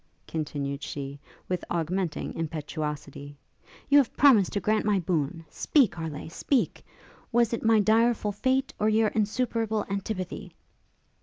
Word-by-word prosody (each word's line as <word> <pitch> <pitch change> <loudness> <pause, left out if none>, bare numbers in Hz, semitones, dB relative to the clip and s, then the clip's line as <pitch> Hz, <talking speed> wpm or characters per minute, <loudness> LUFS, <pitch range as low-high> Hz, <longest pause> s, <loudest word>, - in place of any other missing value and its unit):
continued 145 -3 -3
she, 140 0 -6 0.3
with 180 -1 -2
augmenting 175 0 -2
impetuosity; 150 -2 -5 0.5
'you 285 0 +7
have 270 - 0
promised 240 -10 +6
to 205 - -1
grant 215 +3 +1
my 210 -1 +2
boon, 165 -2 -1
speak, 270 - +2
Harleigh, 160 -3 -6
speak! 245 - -1 0.5
was 235 -1 +3
it 230 - -1
my 225 -1 +5
direful 220 0 +3
fate, 260 +6 0
or 215 - +3
your 220 0 +3
insuperable 220 0 0
antipathy?' 195 -2 -4
200 Hz, 130 wpm, -27 LUFS, 160-225 Hz, 0.5 s, you